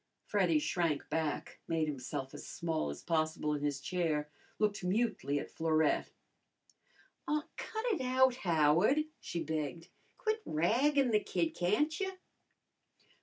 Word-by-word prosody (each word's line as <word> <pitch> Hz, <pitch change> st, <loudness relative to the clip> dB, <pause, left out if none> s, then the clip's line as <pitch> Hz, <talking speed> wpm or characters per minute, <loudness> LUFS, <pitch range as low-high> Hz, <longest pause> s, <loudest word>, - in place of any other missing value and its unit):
Freddy 320 Hz, -, +3 dB
shrank 170 Hz, -, 0 dB
back, 160 Hz, -2 st, -2 dB
made 160 Hz, -1 st, +1 dB
himself 135 Hz, -1 st, -4 dB
as -, -, -8 dB
small 160 Hz, -, -2 dB
as 70 Hz, -, -7 dB
possible 155 Hz, -2 st, 0 dB
in 145 Hz, -, -2 dB
his 145 Hz, -2 st, 0 dB
chair, 155 Hz, -1 st, -1 dB, 0.3 s
looked 210 Hz, -2 st, 0 dB
mutely 185 Hz, -, 0 dB
at -, -, -4 dB
Florette. 160 Hz, -1 st, +2 dB, 1.2 s
"Aw, 300 Hz, 0 st, +1 dB
cut 440 Hz, +1 st, -4 dB
it 430 Hz, -, +1 dB
out, 260 Hz, 0 st, +4 dB
Howard," 175 Hz, -, +4 dB, 0.2 s
she 170 Hz, -1 st, -4 dB
begged. 155 Hz, +1 st, -3 dB, 0.3 s
"Quit 435 Hz, 0 st, -1 dB
raggin' 250 Hz, -, +2 dB
the 210 Hz, -, +5 dB
kid, 175 Hz, -5 st, -1 dB
can't 215 Hz, -, +1 dB
you?" 380 Hz, -1 st, -1 dB
170 Hz, 130 wpm, -33 LUFS, 155-255 Hz, 1.2 s, the